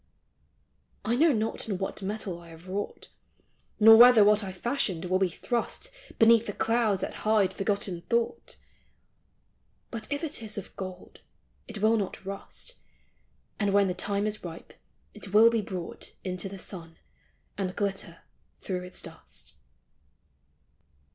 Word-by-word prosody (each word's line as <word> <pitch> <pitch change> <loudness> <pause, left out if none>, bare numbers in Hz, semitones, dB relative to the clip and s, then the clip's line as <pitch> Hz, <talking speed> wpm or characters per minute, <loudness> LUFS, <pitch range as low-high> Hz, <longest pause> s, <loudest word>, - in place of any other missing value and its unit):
I 230 - +2
know 315 +5 +5
not 225 -2 -2
in 195 - -1
what 195 +2 -4
metal 195 -3 -4
I 170 - -14
have 165 +2 -13
wrought; 200 +2 -5 0.7
Nor 225 +1 +9
whether 240 -2 +9
what 210 +1 +5
I 190 - -4
fashioned 190 -3 -1
will 185 +1 +1
be 190 -1 +2
thrust 240 - -3 0.3
Beneath 230 0 +6
the 205 - -3
clouds 225 -4 +1
that - - -3
hide 215 -3 +3
forgotten 195 -3 -2
thought; 235 - -1 1.3
But 230 +2 -6
if 285 +3 -2
it 310 -6 -2
is 215 -2 -5
of 205 - -7
gold 185 -1 -8 0.5
it 215 -2 -7
will 225 +1 +5
not 195 -2 -4
rust; 200 - -6 0.8
And 205 -2 +1
when 200 -1 +5
the 180 - 0
time 200 +2 -1
is 215 0 -3
ripe 170 -2 -9 0.4
it 205 -2 -8
will 225 +2 +8
be 230 -2 +1
brought 185 -4 -6
Into 185 0 -3
the 195 - -8
sun, 170 -3 -7 0.6
and 185 -2 -3
glitter 195 -4 -2 0.4
through 185 -2 -3
its 180 0 -6
dust. - - -11
205 Hz, 150 wpm, -28 LUFS, 185-225 Hz, 1.3 s, Nor